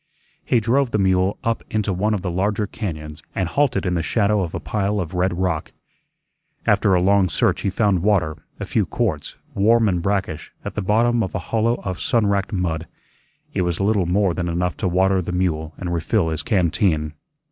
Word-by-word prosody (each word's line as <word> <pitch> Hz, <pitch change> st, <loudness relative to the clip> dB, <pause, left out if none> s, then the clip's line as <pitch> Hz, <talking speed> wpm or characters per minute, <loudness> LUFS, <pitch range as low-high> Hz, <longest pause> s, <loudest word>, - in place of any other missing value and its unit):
He 120 Hz, -, +2 dB
drove 125 Hz, +4 st, +2 dB
the 110 Hz, -, 0 dB
mule 95 Hz, 0 st, +2 dB
up 115 Hz, 0 st, -1 dB
into 105 Hz, -2 st, 0 dB
one 105 Hz, +4 st, +1 dB
of 95 Hz, -, -4 dB
the 90 Hz, -, -2 dB
larger 100 Hz, +4 st, 0 dB
cañóns 75 Hz, -8 st, -6 dB
and 95 Hz, -, 0 dB
halted 130 Hz, +4 st, +1 dB
in 90 Hz, -, 0 dB
the 85 Hz, -, 0 dB
shadow 105 Hz, +3 st, +1 dB
of 85 Hz, -3 st, -3 dB
a -, -, -2 dB
pile 105 Hz, +3 st, -1 dB
of 90 Hz, -1 st, -4 dB
red 90 Hz, 0 st, 0 dB
rock. 90 Hz, -4 st, -1 dB, 0.9 s
After 95 Hz, -2 st, +3 dB
a 90 Hz, -, +3 dB
long 100 Hz, -1 st, +4 dB
search -, -, +1 dB
he -, -, 0 dB
found 95 Hz, -2 st, +1 dB
water, 90 Hz, -6 st, +2 dB, 0.2 s
a -, -, -3 dB
few 105 Hz, -5 st, 0 dB
quarts, 90 Hz, -11 st, -2 dB, 0.2 s
warm 110 Hz, +3 st, +4 dB
and 90 Hz, -3 st, +1 dB
brackish, 95 Hz, -4 st, -2 dB
at -, -, -4 dB
the -, -, -2 dB
bottom 115 Hz, +4 st, +2 dB
of 95 Hz, -, -3 dB
a 90 Hz, -, -5 dB
hollow 115 Hz, +1 st, +3 dB
of 95 Hz, -2 st, -4 dB
sunwracked 105 Hz, -9 st, +1 dB
mud; 85 Hz, -5 st, -2 dB, 0.7 s
it -, -, 0 dB
was 90 Hz, -1 st, 0 dB
little 100 Hz, -2 st, +2 dB
more 95 Hz, 0 st, +2 dB
than 85 Hz, 0 st, -2 dB
enough 85 Hz, -1 st, -1 dB
to -, -, -1 dB
water 95 Hz, +1 st, +2 dB
the 90 Hz, -, -4 dB
mule 80 Hz, -4 st, -1 dB
and 90 Hz, -1 st, -3 dB
refill 80 Hz, 0 st, +1 dB
his 80 Hz, -1 st, -2 dB
canteen. 85 Hz, -6 st, +1 dB
95 Hz, 200 wpm, -22 LUFS, 85-105 Hz, 0.9 s, long